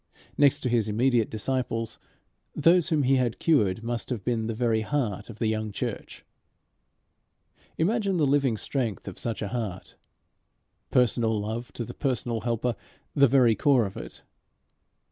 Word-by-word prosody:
Next 145 Hz, -2 st, +4 dB
to 125 Hz, -, -1 dB
his 115 Hz, -3 st, +1 dB
immediate 115 Hz, +1 st, +2 dB
disciples, 115 Hz, -1 st, -2 dB, 0.6 s
those 170 Hz, +2 st, +4 dB
whom 155 Hz, -4 st, +2 dB
he 135 Hz, +1 st, +3 dB
had 120 Hz, -3 st, 0 dB
cured 110 Hz, -, +2 dB
must 120 Hz, 0 st, -3 dB
have 120 Hz, -6 st, -3 dB
been 115 Hz, -3 st, -1 dB
the 115 Hz, -, -3 dB
very 115 Hz, -1 st, +1 dB
heart 110 Hz, -5 st, -2 dB
of 110 Hz, -, -9 dB
the 115 Hz, -, -1 dB
young 110 Hz, -1 st, -1 dB
church. -, -, -5 dB, 1.5 s
Imagine 200 Hz, +2 st, +1 dB
the 155 Hz, -, +3 dB
living 135 Hz, -4 st, +2 dB
strength 115 Hz, -4 st, -3 dB
of 95 Hz, -, -7 dB
such 115 Hz, -3 st, -3 dB
a 100 Hz, -, -3 dB
heart 110 Hz, -6 st, -5 dB, 0.9 s
personal 115 Hz, -3 st, +2 dB
love 110 Hz, +4 st, -4 dB
to 120 Hz, -, -4 dB
the -, -, -8 dB
personal 120 Hz, -4 st, -2 dB
helper 120 Hz, 0 st, -1 dB, 0.4 s
the 140 Hz, 0 st, +5 dB
very 125 Hz, -3 st, +5 dB
core 125 Hz, +2 st, +3 dB
of 95 Hz, -, -6 dB
it. -, -, -9 dB
120 Hz, 155 wpm, -27 LUFS, 110-135 Hz, 1.5 s, the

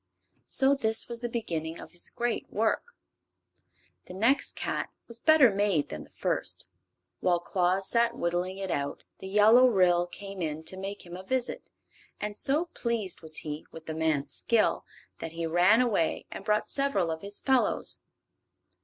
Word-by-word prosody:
So 270 Hz, 0 st, +5 dB
this 225 Hz, -5 st, +2 dB
was 235 Hz, -1 st, -6 dB
the 240 Hz, -, -2 dB
beginning 165 Hz, -9 st, -3 dB
of -, -, -11 dB
his 175 Hz, -, -6 dB
great 240 Hz, 0 st, -2 dB
work. 475 Hz, -, -1 dB, 1.1 s
The 180 Hz, -, -9 dB
next 240 Hz, +8 st, +2 dB
cat -, -, -2 dB, 0.2 s
was 235 Hz, 0 st, -8 dB
better 305 Hz, -4 st, +6 dB
made 195 Hz, -6 st, +1 dB
than 75 Hz, -, -7 dB
the -, -, -22 dB
first. -, -, -2 dB, 0.5 s
While 175 Hz, -2 st, +2 dB
Claus 185 Hz, +2 st, +1 dB
sat 235 Hz, 0 st, +2 dB
whittling 175 Hz, +2 st, -1 dB
it 195 Hz, -2 st, -4 dB
out 140 Hz, -2 st, -3 dB, 0.2 s
the 190 Hz, -, -7 dB
Yellow 215 Hz, +6 st, +6 dB
Ryl 180 Hz, -6 st, +3 dB
came 195 Hz, +1 st, -8 dB
in 155 Hz, -1 st, -3 dB
to 185 Hz, -, -4 dB
make 195 Hz, +1 st, -6 dB
him 175 Hz, 0 st, -9 dB
a 185 Hz, -, -7 dB
visit, 250 Hz, +6 st, -3 dB, 0.5 s
and 210 Hz, 0 st, -4 dB
so 295 Hz, +9 st, +1 dB
pleased 225 Hz, -6 st, -2 dB
was 155 Hz, -1 st, -3 dB
he 150 Hz, 0 st, -5 dB
with 160 Hz, -1 st, -11 dB
the 160 Hz, -, -4 dB
man's 155 Hz, -3 st, -1 dB
skill 230 Hz, -2 st, +2 dB, 0.3 s
that 165 Hz, -, -6 dB
he 165 Hz, 0 st, -3 dB
ran 180 Hz, +8 st, +4 dB
away 200 Hz, -10 st, 0 dB
and -, -, -7 dB
brought 210 Hz, 0 st, +1 dB
several 275 Hz, -12 st, 0 dB
of 160 Hz, 0 st, -5 dB
his 200 Hz, +1 st, -5 dB
fellows. 265 Hz, -2 st, +1 dB
195 Hz, 170 wpm, -28 LUFS, 170-235 Hz, 1.1 s, better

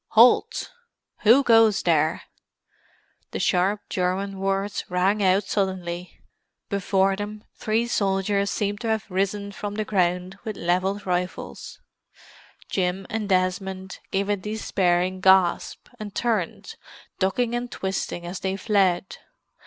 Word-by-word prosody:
"Halt! 250 Hz, -, +5 dB, 0.5 s
Who 240 Hz, +6 st, +6 dB
goes 225 Hz, -4 st, +5 dB
there?" 160 Hz, -1 st, +2 dB, 1.1 s
The -, -, -5 dB
sharp 195 Hz, +3 st, +2 dB
German 190 Hz, +2 st, -1 dB
words 195 Hz, +1 st, -1 dB
rang 190 Hz, +4 st, +1 dB
out 190 Hz, +1 st, +3 dB
suddenly. 185 Hz, -3 st, -3 dB, 0.5 s
Before 195 Hz, -1 st, +2 dB
them 210 Hz, +1 st, -6 dB
three 225 Hz, +2 st, 0 dB
soldiers 200 Hz, -2 st, 0 dB
seemed 205 Hz, 0 st, -2 dB
to 235 Hz, -, -3 dB
have 220 Hz, -1 st, 0 dB
risen 200 Hz, +2 st, -1 dB
from 205 Hz, +1 st, -5 dB
the 215 Hz, 0 st, -2 dB
ground 180 Hz, -1 st, 0 dB
with 215 Hz, -3 st, -5 dB
levelled 185 Hz, +4 st, 0 dB
rifles. 180 Hz, 0 st, -4 dB, 0.9 s
Jim 185 Hz, 0 st, -1 dB
and 220 Hz, -2 st, -2 dB
Desmond 190 Hz, 0 st, -1 dB
gave 195 Hz, +1 st, 0 dB
a 205 Hz, -, +2 dB
despairing 185 Hz, -3 st, 0 dB
gasp, 190 Hz, -2 st, +3 dB
and 205 Hz, -2 st, -7 dB
turned, 235 Hz, -, -2 dB, 0.4 s
ducking 230 Hz, +5 st, +1 dB
and 240 Hz, 0 st, -3 dB
twisting 190 Hz, -2 st, -3 dB
as 180 Hz, +2 st, -5 dB
they 190 Hz, 0 st, -2 dB
fled. 190 Hz, -3 st, +1 dB
195 Hz, 120 wpm, -24 LUFS, 185-210 Hz, 1.1 s, Who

